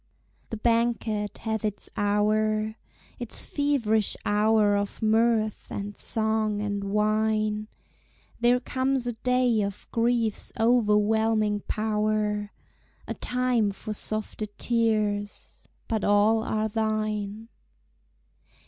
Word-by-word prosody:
The 225 - -4
banquet 230 -2 0
hath 220 -1 -3
its 210 -1 -3
hour, 215 +1 +1 0.5
Its 240 -2 -2
feverish 235 -8 +1
hour 210 0 +3
of 200 0 -2
mirth, 220 0 +2
and 205 0 -5
song, 220 -1 0
and 205 -1 -2
wine; 215 +1 0 0.7
There 240 +1 +4
comes 260 0 -1
a 245 - 0
day 250 -1 +1
of 200 -1 -4
griefs 230 -2 0
overwhelming 220 -2 +3
power, 210 -1 -1 0.6
A - - -2
time 250 -4 0
for 215 +2 -6
softer 215 0 -4
tears 210 -2 -1 0.2
but 220 -2 -1
all 210 +2 +3
are 215 -1 -1
thine. 215 0 -2
215 Hz, 100 wpm, -26 LUFS, 210-225 Hz, 0.7 s, There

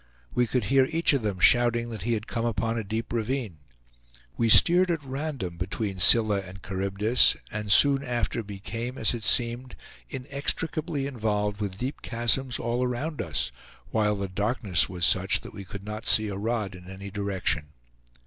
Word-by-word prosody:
We 125 -1 +1
could 125 0 -1
hear 135 +4 +3
each 165 -1 +2
of 140 - 0
them 105 -3 -3
shouting 120 +3 +3
that 110 -4 -7
he 115 +5 -1
had 110 -1 -3
come 115 - -4
upon 115 0 -1
a 115 - -3
deep 110 +4 -4
ravine. 115 - -3 0.8
We 115 -1 0
steered 180 +9 +7
at 165 -4 -2
random 135 - -5
between 95 +2 -4
Scylla 105 +1 +6
and 95 0 -10
Charybdis, 100 +5 +2 0.2
and 105 -1 -4
soon 140 +4 +7
after 120 -2 -2
became, 115 +5 -6
as 110 - +1
it 115 -2 -6
seemed, 120 +2 0 0.3
inextricably 140 +2 -3
involved 105 -5 -2
with 95 -2 -4
deep 130 +6 -5
chasms 120 +2 0
all 120 +2 -2
around 140 +5 -3
us, 65 -7 -2 0.4
while 105 -1 +1
the 100 -1 -4
darkness 100 -1 +1
was 90 -3 -1
such 95 +2 +3
that - - -11
we 100 - -8
could 100 +1 -9
not 105 +1 -7
see 110 -1 +3
a 100 - -5
rod 105 -1 -3
in 90 0 -12
any 100 +1 -9
direction. 95 -6 -1
110 Hz, 175 wpm, -26 LUFS, 100-125 Hz, 0.8 s, steered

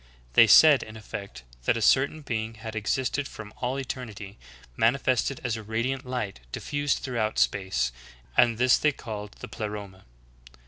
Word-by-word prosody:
They 115 - +7
said 145 +6 +8
in 110 0 -9
effect 100 - -8 0.2
that - - +2
a - - -3
certain 140 +7 +3
being 115 -3 -3
had 110 0 -8
existed 130 +5 -1
from 110 -1 -10
all 125 +2 -2
eternity, 115 -6 -6 0.4
manifested 130 +2 +1
as 120 -2 -1
a 110 - -6
radiant 120 +5 -2
light 125 - -3
diffused 145 0 -1
throughout 115 -5 -1
space, 95 -11 +1 0.4
and 115 -2 +4
this 125 0 +4
they 150 -1 +2
called 105 -4 -7
the - - -6
Pleroma. 105 -3 -7
115 Hz, 150 wpm, -27 LUFS, 105-130 Hz, 0.4 s, said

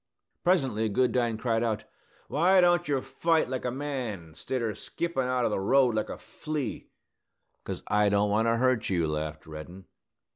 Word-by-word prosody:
Presently 130 - +2
Goodine 120 0 +1
cried 115 0 0
out, 110 -2 -1 0.4
"Why 180 +6 +4
don't 175 -1 +4
yer 140 -3 +1
fight, 165 -1 +1
like 130 -1 -3
a - - +1
man, 120 - -4
stidder 115 +6 -2
skippin' 170 -1 -3
out 125 -1 +1
o' - - +2
the 105 - -1
road 125 +5 +4
like 110 0 -1
a - - -5
flea?" 150 -7 -5 0.8
"'Cause - - -5
I 105 0 +3
don't 100 0 +2
want 110 +2 +2
to 115 0 +2
hurt 130 -1 +1
you," 85 -4 +1
laughed 75 0 -4
Reddin. 80 +5 -9
120 Hz, 170 wpm, -28 LUFS, 105-135 Hz, 0.8 s, Why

